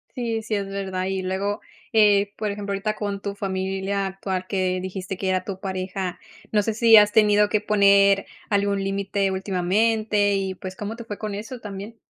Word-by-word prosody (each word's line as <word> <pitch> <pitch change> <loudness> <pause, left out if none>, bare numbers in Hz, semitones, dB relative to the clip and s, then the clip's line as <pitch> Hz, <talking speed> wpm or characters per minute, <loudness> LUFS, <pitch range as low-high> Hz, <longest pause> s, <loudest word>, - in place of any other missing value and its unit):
Sí, 230 -3 -2
sí, 215 -1 -3
es 200 -1 -2
verdad. 190 -1 -3
Y 190 0 -2
luego, 195 +3 -2 0.3
eh, 205 -2 +4
por 215 -1 -2
ejemplo, 200 0 -4
ahorita 215 +2 -2
con 200 -1 -4
tu 200 -1 -3
familia 195 0 -2
actual, 190 -1 -4
que 185 -2 0
dijiste 190 0 -5
que 190 0 -1
era 185 -1 +1
tu 195 -2 -5
pareja, 185 -1 -4 0.3
no 210 - +3
sé 220 +1 -1
si 225 -1 +7
has 210 0 +5
tenido 210 -2 +5
que 210 0 0
poner 200 -1 +4 0.2
algún 200 -1 +1
límite 195 0 -1
últimamente 205 +2 +1
y, 190 -1 -1
pues, 185 +1 -8
¿cómo 215 +2 -5
te 235 - -8
fue 205 -3 -6
con 210 -2 -5
eso 225 +4 -7
también? 205 +2 -8
200 Hz, 190 wpm, -24 LUFS, 190-210 Hz, 0.3 s, si